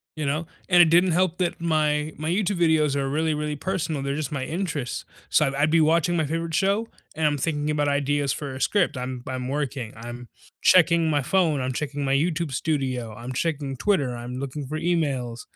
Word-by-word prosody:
You 155 -1 -3
know? 150 +4 -1 0.2
And 175 -1 +7
it 170 - +6
didn't 175 +2 +5
help 180 0 +1
that 175 -2 -1
my 155 -2 +1
my 155 +1 -3
YouTube 195 +1 0
videos 155 -4 +3
are 135 -1 -1
really, 155 +2 0
really 150 0 -2
personal, 160 -2 -2
they're 140 +1 -2
just 150 -3 -3
my 140 -3 -2
interests, 160 -7 -3 0.2
so, - - +4
I 135 +1 -2
I'd 155 +1 +3
be 165 -1 +5
watching 165 +2 +3
my 155 - +1
favorite 165 +2 -3
show, 200 +6 +1 0.3
and 160 0 0
I'm 145 -1 +1
thinking 150 +1 -1
about 145 -1 +1
ideas 140 -1 +1
for 140 -3 -5
a 130 - -7
script, 190 -9 +2
I'm 125 -1 -5
I'm 130 -1 -3
working, 135 -5 -3
I'm 120 +2 -8 0.3
checking 170 -2 +5
my 145 -2 +2
phone, 160 -2 +1
I'm 130 0 -1
checking 145 +2 -3
my 135 -1 +1
YouTube 160 +1 0
studio, 130 -6 -1
I'm 120 +3 -7
checking 140 -2 -2
Twitter, 140 -9 +1
I'm 120 +1 -6
looking 140 +1 -5
for 155 - -3
emails, 140 -9 -1
150 Hz, 210 wpm, -25 LUFS, 135-165 Hz, 0.3 s, And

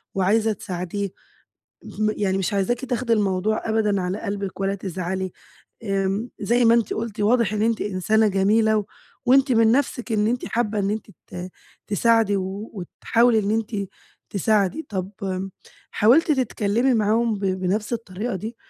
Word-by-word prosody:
وعايزة 215 +4 +2
تساعديه، 185 +1 -4 0.9
م 215 0 +3
يعني 195 -2 0
مش 195 - -1
عايزاكِ 230 +6 0
تاخدي 250 -2 -1
الموضوع 210 0 0
أبدًا 210 -3 +1
على 180 +3 -3
قلبِك 200 -2 -4
ولا 195 0 0
تزعلي، 185 -1 -4 0.5
آمم 195 +3 -1
زي 240 +4 +2
ما 230 0 +6
أنتِ 235 -4 +1
قُلتِ، 220 -1 -4
واضح 225 0 +3
إن 210 0 -1
أنتِ 230 0 +1
إنسانة 210 +3 +2
جميلة 215 +3 +3
و 210 - -2 0.4
وأنتِ 265 +1 +5
من 225 -1 +5
نفْسِك 250 -2 0
إن 210 -1 +2
أنتِ 245 +2 -1
حابّة 220 -2 -1
إن 200 0 0
أنتِ 215 +1 -3 0.2
ت 180 +1 -7 0.4
تساعدي 220 0 +3
و 195 +3 -4
وتحاولي 225 +5 +1
إن 205 -1 0
أنتِ 215 -3 -2 0.4
تساعدي. 210 - +1
طَب 190 -2 -3 0.8
حاولتِ 280 +10 +4
تتكلّمي 245 -2 +1
معاهم 225 +1 +2
ب - - -11
بنفْس 190 +4 -1
الطريقة 220 -1 -3
دي، 220 +5 -6
210 Hz, 150 wpm, -23 LUFS, 195-230 Hz, 0.9 s, ما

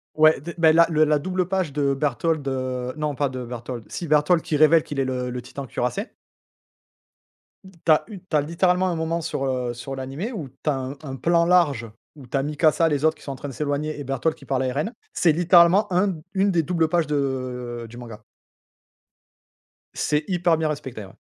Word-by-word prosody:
Ouais, 155 -1 +5
de 170 +4 -7
beh, 160 -1 +5
la 165 +1 +6
le 155 -1 +3
la 150 -1 +3
double 185 +3 -1
page 185 -6 -1
de 140 -2 +1
Bertholdt, 150 +1 -1
heu, 130 -1 -3
non 150 -2 -2
pas 145 - +1
de 130 -1 -5
Bertholdt, 120 0 -6
si 170 - -5
Bertholdt 150 +3 +3
qui 155 - -2
révèle 155 +2 +6
qu'il 145 - -6
est - - +2
le 125 -1 -2
le 125 0 -4
Titan 135 +3 -8
Cuirassé 125 - -2 1.8
tu 165 - +3
as 155 - +5
u 205 - -8
tu 175 -4 -1
as, - - +3
littéralement, 180 +4 +1
un 175 - -1
moment 160 +1 -1
sur, 140 -4 -3
heu, 125 -2 -1
sur 135 +3 -7
l'animé 135 - -5
où 165 - -6
tu 135 +4 -5
as 150 - +3
un 135 +1 -5
un 135 -2 -6
plan 170 +5 +2
large 150 -10 +3 0.3
où 135 -4 -13
tu 135 - -1
as 135 - 0
Mikasa, 155 +2 +2
les 145 -2 0
autres 160 0 +3
qui - - -17
sont 140 - -5
en - - -8
train 145 +2 -7
de - - -8
s'éloigner 150 +2 -2
et - - -4
Bertholdt 135 +4 -1
qui 135 - -15
parle 130 -1 0
à 130 - 0
Eren. 150 - -2 0.2
C'est 165 -3 +3
littéralement 175 +4 +5
1 185 +3 +3
d 165 -4 -5
1 195 0 +2
des 170 -2 +2
doubles 165 0 +1
pages 170 -2 +1
de 130 -4 -3
du 120 - -12
manga 115 -3 -9 1.7
c'est 150 +1 0
hyper 175 -3 +2
bien 160 - 0
respecté, 130 -8 -5
ouais. 95 - -15
150 Hz, 220 wpm, -23 LUFS, 130-170 Hz, 1.8 s, la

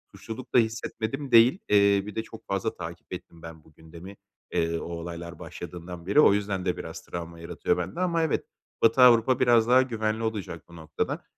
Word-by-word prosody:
suçluluk 115 +3 -9
da - - +5
hissetmedim 115 +4 -3
değil. 120 +9 +6
Eee, 100 -1 +4
bir 105 - -8
de 110 - -2
çok 110 - -13
fazla 100 +3 -2
takip 85 -1 -8
ettim 85 -1 -9
ben 80 -2 -11
bu 80 - -22
gündemi, 85 +5 -12 0.4
eee, 85 0 0
o - - -7
olaylar 85 0 -7
başladığından 90 0 -9
beri. 100 +10 +3
O 150 - +7
yüzden 100 -2 -2
de - - 0
biraz - - -7
travma 85 -1 -7
yaratıyor 85 - -1
bende 90 - -4
ama 170 -2 +1
evet. 160 - -1 0.4
Batı 115 +3 +4
Avrupa 125 +1 +6
biraz 120 -3 +4
daha 130 +1 +6
güvenli 110 -3 -2
olacak 100 -8 -4
bu 85 - -15
noktada. 80 -2 -4
100 Hz, 190 wpm, -26 LUFS, 85-115 Hz, 0.4 s, O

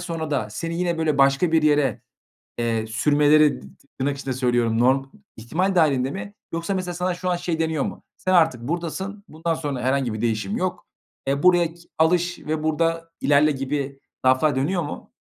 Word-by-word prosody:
sonra 165 -3 -4
da 110 -7 -1
seni 165 +10 -4
yine, 175 -2 0
böyle, 155 -3 0
başka 140 +5 +3
bir 160 -1 +4
yere, 145 -5 +2 0.6
eee, 115 -2 -1
"sürmeleri" 145 - +3
dı 65 0 -15
ti - - -28
tırnak 140 +1 0
içinde 135 -1 -3
söylüyorum. 120 -3 +1
"Norm 130 +2 +3 0.3
ihtimal 180 - -1
dâhilinde 140 -6 +3
mi" 200 +3 -6 0.2
yoksa 170 +4 -2
mesela 185 -2 -3
sana 180 +1 -1
şu 180 +1 -3
an 175 - +2
şey 170 -2 -3
deniyor 160 -3 0
mu: - - -7
"Sen 185 - -1
artık 160 -9 +4
buradasın, 175 - -4
bundan 165 +2 -2
sonra 145 -5 -3
herhangi 130 -2 0
bir 110 - -5
değişim 110 -4 -1
yok. 185 -1 -3 0.4
Eee, 140 +3 0
buraya 175 -2 +4
ki 170 0 -19
alış 175 +2 +2
ve 155 0 -3
burada 165 +1 0
ilerle." 145 +2 +4
gibi 135 0 -3 0.3
laflar 130 +3 +4
dönüyor 170 +7 0
mu? 145 - -8
150 Hz, 185 wpm, -23 LUFS, 135-170 Hz, 0.6 s, bir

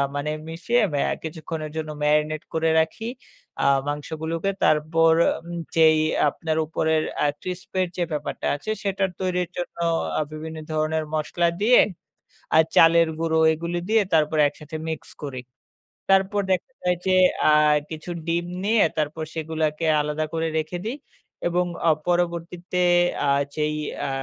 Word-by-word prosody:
মানে 145 +1 -2 0.2
মিশিয়ে 210 +9 0
অ্যা 145 - 0
কিছুক্ষণের 155 -1 -5
জন্য 155 -1 -3
marinate 150 +1 +1
করে 160 0 +1
রাখি 160 +7 -1 0.6
আ - - +2 0.2
মাংসগুলোকে। 160 +5 -3
তারপর 160 +2 +4 0.3
উম 175 0 -5 0.2
যেই 160 -1 +6 0.3
আপনার 160 +2 -3
উপরের 160 0 0 0.2
আ - - +3 0.2
crisp 180 0 -6
এর 185 - +1
যে 175 - +1
ব্যাপারটা 150 -1 -4
আছে, 180 +9 -8
সেটার 195 -1 0
তৈরির 180 -2 -1
জন্য 175 - -5 0.4
আ - - +2
বিভিন্ন 160 +1 -7
ধরনের 155 0 0
মসলা 170 +3 0
দিয়ে 240 +4 +6 0.8
আর 160 - +7
চালের 165 0 +6
গুঁড়ো 160 -1 +1
এগুলো 170 +2 -3
দিয়ে 220 -1 +4
তারপর 155 0 +2
একসাথে 150 +2 -9
mix 160 - -3 0.2
করি। 135 -4 -5 0.7
তারপর 195 +1 +3
দেখা 185 +8 0
যায় 180 0 +1
যে, - - +3 0.4
আ - - +6 0.4
কিছু 160 +2 -7 0.2
ডিম 170 +1 0 0.2
নিয়ে 220 +1 +4
তারপর 155 +1 -1
সেগুলাকে 160 0 -2 0.2
আলাদা 150 +1 -2
করে 165 0 0
রেখে 155 +3 -2
দিই 245 +5 -3 0.5
এবং 180 +1 +1 0.2
আ - - +7 0.2
পরবর্তীতে 175 +1 -1 0.5
আ - - +3 0.3
যেই 150 0 0 0.3
আ - - -2
160 Hz, 145 wpm, -24 LUFS, 155-175 Hz, 0.8 s, আর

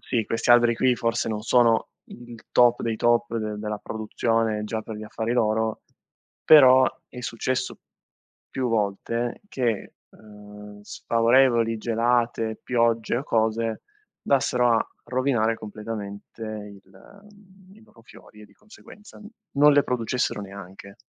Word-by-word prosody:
sì, 115 -4 -2
questi 115 - -1
alberi 120 -1 +5
qui 130 0 +2
forse 115 0 -1
non 105 -1 -3
sono 115 -1 +3 0.2
il 120 -1 -11 0.2
top 120 -1 +4
dei 115 -1 -2
top 120 0 +1
de 105 -1 -4
della 105 0 -4
produzione 110 0 -2
già 110 +1 -4
per 110 -1 -8
gli 110 - -8
affari 110 +2 -3
loro, 110 -2 0 0.6
però 130 -4 +7 0.2
è 125 - -10
successo 125 +3 -3 0.7
più 130 -2 -2
volte 115 +2 -2
che, 120 -6 -2 0.2
ehm, 105 -1 -14
sfavorevoli 115 0 +2
gelate, 115 -1 0
piogge 115 -2 0
o - - -4
cose 110 -1 -1 0.4
andassero 125 -3 +2
a 110 - 0 0.2
rovinare 120 -3 0
completamente 105 0 -8 0.4
il 95 - -19 0.5
i 220 - -19
loro 115 - -21
fiori 105 -1 -17
e, - - -14
di 100 - -24
conseguenza, 210 -1 -16 0.3
non 145 +1 +5
le 145 0 +4
producessero 125 -2 -2
neanche. 100 0 -11
115 Hz, 130 wpm, -24 LUFS, 110-120 Hz, 0.7 s, però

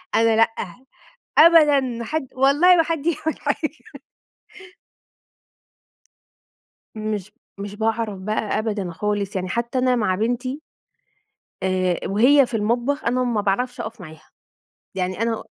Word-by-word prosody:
أنا 225 0 +4
لأ، 225 - +5 0.9
أبدًا 310 -3 +7
ما 235 -3 -4
حد 295 +1 -3
والله 290 +8 +5
ما 330 - +5
حد 325 -2 -3
يعمل 320 -1 -1
حاجة. 300 +1 -4 2.9
مش 215 -2 -4 0.3
مش 200 0 -7
باعرف 220 -2 -2
بقى 215 +2 -2
أبدًا 210 -5 -3
خالص، 205 +2 -3
يعني 185 0 -2
حتى 235 +2 -2
أنا 255 0 +2
مع 210 -5 0
بنتي 245 +6 -2 1.0
آآ، 185 -2 0
وهي 255 +7 +5
في 230 - -3
المطبخ 240 +7 -1
أنا 250 +2 +1
ما 235 -4 0
باعرفش 245 +6 -1
أقف 220 -2 -6
معاها، 155 -2 -13 0.7
يعني 185 +2 -2
أنا 230 -1 -2
230 Hz, 125 wpm, -22 LUFS, 205-265 Hz, 2.9 s, أبدًا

